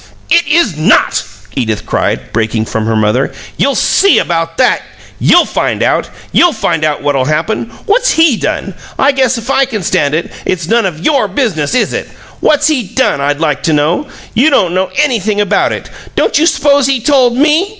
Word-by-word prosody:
"It 340 Hz, +1 st, +3 dB
is 295 Hz, -, +2 dB
NOT!" 155 Hz, +8 st, +2 dB, 0.3 s
Edith 110 Hz, -5 st, -2 dB
cried, -, -, -2 dB
breaking 110 Hz, 0 st, -1 dB
from 110 Hz, 0 st, -3 dB
her 115 Hz, -, 0 dB
mother. 110 Hz, +6 st, +1 dB, 0.2 s
"You'll 280 Hz, -, 0 dB
SEE 395 Hz, -, +3 dB
about 165 Hz, -1 st, -1 dB
that! 255 Hz, -, +2 dB, 0.4 s
You'll 350 Hz, -, +4 dB
find -, -, -1 dB
out! -, -, 0 dB, 0.2 s
You'll 350 Hz, -2 st, +4 dB
find 155 Hz, -, -1 dB
out 150 Hz, -1 st, -1 dB
what'll 140 Hz, -3 st, 0 dB
happen! 130 Hz, -5 st, -2 dB, 0.2 s
What's -, -, +2 dB
HE 320 Hz, -7 st, +3 dB
done? -, -, -3 dB, 0.2 s
I 275 Hz, -, +3 dB
guess 260 Hz, -2 st, +1 dB
if 230 Hz, +4 st, -4 dB
I 275 Hz, 0 st, +3 dB
can 220 Hz, -7 st, -5 dB
stand 145 Hz, -2 st, 0 dB
it, 165 Hz, -, -3 dB
it's 175 Hz, -3 st, -2 dB
none 230 Hz, 0 st, +2 dB
of 165 Hz, -2 st, -7 dB
YOUR 275 Hz, -8 st, +2 dB
business, 195 Hz, -, -1 dB
is 250 Hz, -, +1 dB
it? -, -, -4 dB, 0.3 s
What's 300 Hz, 0 st, +2 dB
HE 265 Hz, -10 st, -1 dB
done, 140 Hz, -, +1 dB
I'd 145 Hz, +1 st, -1 dB
like 150 Hz, -4 st, -1 dB
to 160 Hz, -, 0 dB
know? 155 Hz, -, 0 dB, 0.3 s
You 265 Hz, +7 st, +3 dB
don't 185 Hz, -, +1 dB
know 185 Hz, 0 st, 0 dB
anything 225 Hz, -8 st, 0 dB
about 205 Hz, -2 st, +1 dB
it. -, -, -5 dB, 0.3 s
Don't -, -, +1 dB
you 325 Hz, -, +3 dB
s'pose 285 Hz, -3 st, +2 dB
he 270 Hz, -2 st, +1 dB
told 250 Hz, -1 st, +2 dB
ME? 310 Hz, +7 st, +2 dB
215 Hz, 190 wpm, -12 LUFS, -, 0.4 s, You'll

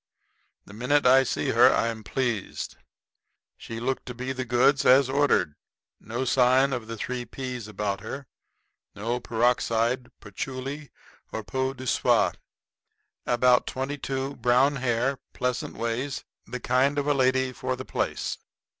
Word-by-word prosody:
The 100 Hz, -, -13 dB
minute 125 Hz, +6 st, +1 dB
I 130 Hz, +1 st, +7 dB
see 130 Hz, -, -1 dB
her 125 Hz, +3 st, +6 dB
I 115 Hz, -, +1 dB
am 110 Hz, -1 st, -6 dB
pleased. 120 Hz, -4 st, -3 dB, 0.8 s
She 115 Hz, 0 st, -7 dB
looked 130 Hz, +3 st, -2 dB
to 125 Hz, -, -6 dB
be 130 Hz, +2 st, -3 dB
the 130 Hz, -1 st, -4 dB
goods 125 Hz, +3 st, +3 dB
as 130 Hz, +1 st, +6 dB
ordered. 135 Hz, -, +2 dB, 0.5 s
No 120 Hz, +4 st, -4 dB
sign 130 Hz, +2 st, +4 dB
of 120 Hz, -3 st, -4 dB
the 115 Hz, 0 st, -6 dB
three 125 Hz, +3 st, -3 dB
p's 125 Hz, -1 st, -6 dB
about 100 Hz, -2 st, -3 dB
her 135 Hz, +6 st, -6 dB, 0.7 s
no 115 Hz, +4 st, -2 dB
peroxide, 120 Hz, +1 st, +1 dB
patchouli, 130 Hz, +7 st, -6 dB, 0.4 s
nor 110 Hz, -, -4 dB
peau 130 Hz, +7 st, -2 dB
de 130 Hz, 0 st, -8 dB
soie; -, -, +3 dB, 1.0 s
about 125 Hz, 0 st, +4 dB
twenty 135 Hz, +2 st, -3 dB
two, 135 Hz, +1 st, -3 dB
brown 130 Hz, +4 st, +3 dB
hair, 125 Hz, +1 st, 0 dB
pleasant 125 Hz, 0 st, -2 dB
ways 115 Hz, +5 st, -3 dB, 0.2 s
the 125 Hz, -, -5 dB
kind 135 Hz, +4 st, +2 dB
of 145 Hz, -, 0 dB
a 145 Hz, -, +3 dB
lady 130 Hz, -1 st, +2 dB
for -, -, -3 dB
the -, -, -8 dB
place. -, -, -2 dB
125 Hz, 145 wpm, -26 LUFS, 115-135 Hz, 1.0 s, I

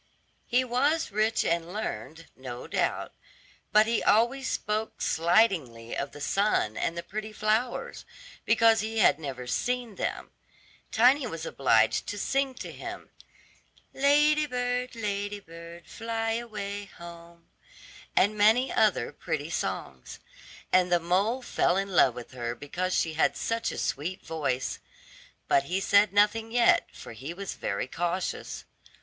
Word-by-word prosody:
He 250 Hz, +2 st, +3 dB
was 275 Hz, +5 st, +1 dB
rich 215 Hz, +2 st, +1 dB
and 170 Hz, 0 st, 0 dB
learned, 165 Hz, -, -5 dB
no 125 Hz, -2 st, -8 dB
doubt, -, -, -1 dB, 0.6 s
but 215 Hz, +1 st, +6 dB
he 230 Hz, 0 st, 0 dB
always 240 Hz, +5 st, +2 dB
spoke 215 Hz, +1 st, -2 dB
slightingly 165 Hz, -, +1 dB
of 140 Hz, 0 st, -3 dB
the -, -, -11 dB
sun 195 Hz, -, +1 dB
and 165 Hz, -, -2 dB
the 170 Hz, -, -4 dB
pretty 215 Hz, +4 st, -6 dB
flowers, 215 Hz, +3 st, -1 dB, 0.4 s
because 225 Hz, 0 st, +4 dB
he 220 Hz, +1 st, -3 dB
had 190 Hz, -7 st, +4 dB
never 135 Hz, -5 st, -6 dB
seen 245 Hz, -, -2 dB
them. -, -, -3 dB, 0.6 s
Tiny 250 Hz, +4 st, +4 dB
was 165 Hz, -6 st, -6 dB
obliged 110 Hz, -7 st, +2 dB
to 205 Hz, -, -4 dB
sing 270 Hz, +5 st, 0 dB
to -, -, -7 dB
him, -, -, -8 dB, 0.8 s
"Lady 295 Hz, +2 st, +4 dB
bird, 250 Hz, -1 st, -2 dB
lady 205 Hz, -2 st, -3 dB
bird, 170 Hz, -1 st, -12 dB
fly 225 Hz, 0 st, -3 dB
away 210 Hz, -3 st, -4 dB
home," 170 Hz, 0 st, -12 dB, 0.7 s
and 205 Hz, +2 st, +3 dB
many 220 Hz, +5 st, +4 dB
other -, -, +2 dB
pretty -, -, -4 dB
songs. -, -, -4 dB, 0.6 s
And 180 Hz, -1 st, +4 dB
the 175 Hz, -, +4 dB
mole 195 Hz, +9 st, 0 dB
fell 180 Hz, -5 st, +1 dB
in 195 Hz, 0 st, -1 dB
love 135 Hz, -9 st, +4 dB
with 120 Hz, -1 st, -9 dB
her 120 Hz, -1 st, -4 dB
because 180 Hz, +7 st, -3 dB
she 160 Hz, -, 0 dB
had 155 Hz, -, +1 dB
such 230 Hz, 0 st, -1 dB
a -, -, -7 dB
sweet 170 Hz, +7 st, -3 dB
voice; 135 Hz, -5 st, -2 dB, 0.7 s
but 140 Hz, -, +3 dB
he 180 Hz, +5 st, -1 dB
said 200 Hz, +1 st, +4 dB
nothing 210 Hz, +2 st, +2 dB
yet, 240 Hz, 0 st, +4 dB
for -, -, -11 dB
he 135 Hz, +10 st, -7 dB
was 195 Hz, +1 st, -5 dB
very 100 Hz, +2 st, -3 dB
cautious. 175 Hz, +6 st, -3 dB
200 Hz, 145 wpm, -28 LUFS, 165-230 Hz, 0.8 s, but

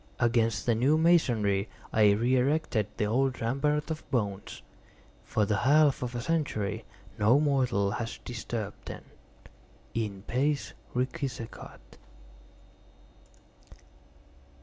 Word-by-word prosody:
Against 115 Hz, -3 st, +2 dB
the 120 Hz, -, +3 dB
new 130 Hz, +7 st, +3 dB
masonry 115 Hz, -, +3 dB, 0.2 s
I 105 Hz, -2 st, +5 dB
re 120 Hz, +5 st, +2 dB
erected 130 Hz, -5 st, +1 dB
the 110 Hz, -, +1 dB
old 130 Hz, +4 st, +1 dB
rampart 150 Hz, +6 st, 0 dB
of 155 Hz, -, -6 dB
bones. 105 Hz, -6 st, -3 dB, 0.6 s
For 110 Hz, -, 0 dB
the 105 Hz, +1 st, 0 dB
half 145 Hz, +4 st, +4 dB
of 125 Hz, -1 st, -4 dB
a 120 Hz, -, -2 dB
century 110 Hz, -9 st, -1 dB, 0.3 s
no 110 Hz, +7 st, +5 dB
mortal 130 Hz, -9 st, +1 dB
has 115 Hz, +2 st, -4 dB
disturbed 110 Hz, -3 st, -5 dB
them. -, -, -8 dB, 0.9 s
_In 105 Hz, -3 st, -3 dB
pace 140 Hz, +3 st, 0 dB, 0.2 s
requiescat! 130 Hz, -2 st, -5 dB
120 Hz, 105 wpm, -29 LUFS, 110-140 Hz, 0.9 s, I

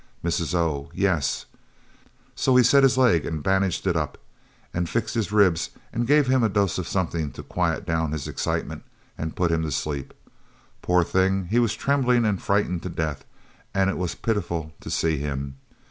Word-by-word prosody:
Mrs. 85 Hz, 0 st, -1 dB
O. 80 Hz, -5 st, -1 dB
"Yes. 85 Hz, -9 st, 0 dB, 0.9 s
So 130 Hz, -, +2 dB
he 125 Hz, -, +7 dB
set 140 Hz, +4 st, +6 dB
his 135 Hz, -2 st, +4 dB
leg 115 Hz, -, +4 dB
and 80 Hz, -3 st, -4 dB
bandaged 95 Hz, -1 st, +1 dB
it 90 Hz, -3 st, +1 dB
up, 75 Hz, -3 st, -2 dB, 0.6 s
and 85 Hz, -1 st, -1 dB
fixed 115 Hz, -2 st, -1 dB
his 110 Hz, -3 st, -1 dB
ribs 95 Hz, -6 st, +3 dB, 0.2 s
and 120 Hz, 0 st, -1 dB
gave 145 Hz, +1 st, +5 dB
him 130 Hz, 0 st, +3 dB
a 110 Hz, -, +3 dB
dose 100 Hz, -3 st, +1 dB
of 90 Hz, -, -4 dB
something 85 Hz, -5 st, -1 dB
to -, -, -8 dB
quiet -, -, -1 dB
down 80 Hz, -2 st, 0 dB
his 75 Hz, -3 st, -3 dB
excitement -, -, -3 dB, 0.3 s
and 80 Hz, 0 st, -5 dB
put 90 Hz, -2 st, +1 dB
him 80 Hz, -1 st, +1 dB
to 80 Hz, -, -2 dB
sleep 70 Hz, -1 st, -3 dB, 0.7 s
poor 90 Hz, 0 st, +3 dB
thing 95 Hz, +2 st, +1 dB
he 120 Hz, -, +4 dB
was 115 Hz, -3 st, +1 dB
trembling 125 Hz, -4 st, +2 dB
and 105 Hz, -4 st, 0 dB
frightened 100 Hz, -4 st, 0 dB
to 90 Hz, -, -5 dB
death 75 Hz, -4 st, -3 dB, 0.5 s
and 95 Hz, 0 st, +3 dB
it -, -, -4 dB
was 90 Hz, -2 st, -2 dB
pitiful 85 Hz, -8 st, -2 dB
to -, -, -9 dB
see 80 Hz, -2 st, +1 dB
him. 70 Hz, -1 st, -4 dB
90 Hz, 185 wpm, -24 LUFS, 80-105 Hz, 0.9 s, he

